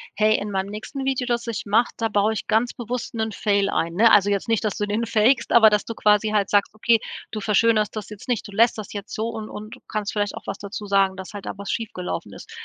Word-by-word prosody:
„Hey, 215 +1 +3
in 205 - -5
meinem 195 0 -2
nächsten 265 +6 -6
Video, 265 -2 -1
das 240 -1 -1
ich 225 -2 -4
mache, 225 +4 +3
da 225 -1 -1
baue 210 +1 +2
ich 215 - -5
ganz 225 +3 +1
bewusst 240 0 -5
'nen 220 -1 -2
Fail 200 -1 +1
ein“, 165 0 -1
ne? 225 +5 +5
Also, 205 -1 +5
jetzt 200 +2 -1
nicht, 225 -1 +1
dass 210 - -1
du 205 - -1
den 220 +3 -1
fakst, 230 +3 +2
aber 225 -2 +7
dass 210 -1 +1
du 230 - -5
quasi 210 0 +3
halt 210 -2 +1
sagst, 205 0 +2
okay, 225 +1 +3 0.3
du 215 - -5
verschönerst 215 +1 +2
das 215 -1 -6
jetzt 210 -2 -11
nicht, 245 -5 -1
du - - -11
lässt 225 +2 +3
das 210 - -7
jetzt 205 0 -7
so 220 +2 -2
und 220 -1 -6
und 215 +3 -9
kannst 210 -1 -3
vielleicht 205 -1 -1
auch - - -10
was 195 - -4
dazu 205 +1 -7
sagen, 195 -1 +3
dass 190 +2 -8
halt 200 - -7
da - - -4
was 200 0 -8
schiefgelaufen 205 -6 -4
ist. - - -12
215 Hz, 260 wpm, -23 LUFS, 205-230 Hz, 0.3 s, aber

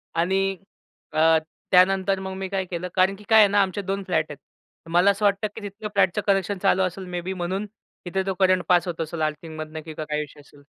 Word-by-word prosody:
आणि 190 +3 +1 0.6
अ, 160 +1 +5 0.3
त्यानंतर 190 +1 +4
मग 190 0 -5
मी 190 - -4
काय 190 -1 -1
केलं? 180 0 -4
कारण 190 +1 +3
की 210 - -15
काय 220 0 +7
आहे 210 - +8
ना, 205 +1 +3
आमचे 195 +1 -1
2 195 +1 -3
फ्लॅट 160 -4 0
आहेत. 145 - -8 0.5
मला 180 +4 +5
असं 200 +1 -2
वाटतं, 200 +1 +2
की 225 - -7
तिथलं 205 +1 -6
फ्लॅटचं 195 +1 +2
कनेक्शन 195 0 +1
चालू 190 -1 +3
असेल 185 +1 -3
मे 180 -1 -4
बी 190 +2 -4
म्हणून 190 +3 -3 0.4
तिथे 190 +2 -1
तो 195 - -1
करंट 185 -1 +3
पास 180 0 +4
होत 165 -1 -3
असेल, 160 0 -4
आर्थिंगमधनं 155 0 -4
की 160 - -7
काय 150 -1 -3
इशू 145 - -14
असेल. 145 0 -18
185 Hz, 215 wpm, -24 LUFS, 170-195 Hz, 0.6 s, आहे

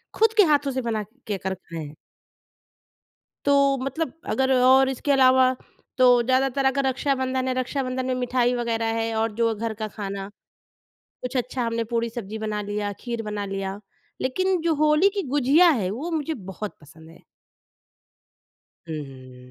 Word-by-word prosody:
खुद 445 0 +3
के 415 - +8
हाथों 290 -4 +2
से 260 0 -2
बना 220 -3 -2 0.2
के 205 - -1
कर 190 0 -3
खाए। 160 -5 -8 1.5
तो 280 -1 +4
मतलब 275 +5 -3 0.2
अगर 265 0 +2
और 265 +1 +6
इसके 265 +2 -1
अलावा 260 -1 +5 0.4
तो 255 - +5 0.2
ज़्यादातर 265 +2 +1
अगर 270 +1 +2
रक्षाबंधन 260 -1 0
है, 255 - +1
रक्षाबंधन 255 0 -2
में 255 - 0
मिठाई 250 0 +1
वग़ैरह 230 -1 -1
है 225 0 -1
और 220 0 0
जो 230 +1 +1
घर 225 +1 -3
का 215 - -1
खाना, 195 -2 -6 0.9
कुछ 250 +1 -3
अच्छा 250 0 -2
हमने 230 0 -1
पूड़ी-सब्जी 230 -2 -3
बना 210 -1 -2
लिया, 205 0 -3
खीर 235 -2 -4
बना 210 -1 -4
लिया 195 0 -4 0.4
लेकिन 370 +7 0
जो 330 -1 +2
होली 305 +6 +4
की 400 - 0
गुजिया 290 +6 +5
है 220 - +1
वो 290 +11 -4
मुझे 320 -1 -1
बहुत 195 - -7
पसंद 160 +2 -16
है। 165 - -16 1.7
हुँ, 160 - -3
हुँ, 130 -2 -13
250 Hz, 155 wpm, -24 LUFS, 210-270 Hz, 1.7 s, के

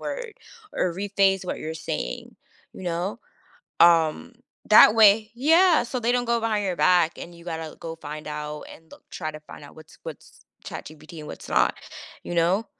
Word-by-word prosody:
word - - -6 0.4
or 175 -2 -1
rephrase 195 -1 +1
what - - -4
you're 160 +1 -5
saying." 60 - -5 0.4
You - - -11
know? 175 +6 -3 0.6
Um, 165 +6 +4 0.4
that 215 0 +8
way 215 0 +5
Yeah, 325 +4 +4
so 250 +1 -4
they 235 +1 0
don't 245 0 +1
go 235 0 +1
behind 215 -2 -1
your 185 -2 -1
back, 175 -2 +3
and 175 - -9
you 170 0 -15
gotta 160 -2 -6
go 165 -1 -7
find 155 0 -8
out 150 0 -6
and 160 0 -17
look - - -16
try 155 -3 -5
to 155 - -9
find 150 - -13
out 145 - -15
what's 155 -1 -15
what's - - -11 0.3
ChatGPT 155 +1 -9
and 150 - -10
what's - - -10
not, - - +2 0.5
you 175 - -5
know? 180 +6 +1
175 Hz, 185 wpm, -24 LUFS, 160-220 Hz, 0.6 s, that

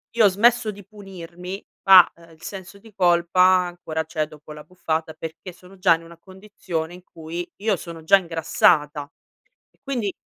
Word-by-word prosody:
io 230 -2 +5
ho - - +8
smesso 225 +3 +2
di 200 -1 -13
punirmi, 185 -2 -10 0.2
ma, 185 -2 +9
ehm, 170 0 -19
il 160 - -20
senso 195 +1 -9
di 220 +2 -17
colpa 175 -1 +2
ancora 175 -3 +2
c'è 155 0 -3
dopo 150 0 -14
l'abbuffata, 160 0 -4
perché 165 +3 -9
sono 180 +2 -17
già 185 -3 +4
in 165 - -11
una 165 0 -14
condizione 185 -3 -6
in 180 - -15
cui 165 +2 -7
io 210 -2 +1
sono 165 -1 -10
già 195 +5 +6
ingrassata. 155 -4 +1 0.8
Quindi, 240 -8 -2
175 Hz, 165 wpm, -22 LUFS, 165-195 Hz, 0.8 s, ma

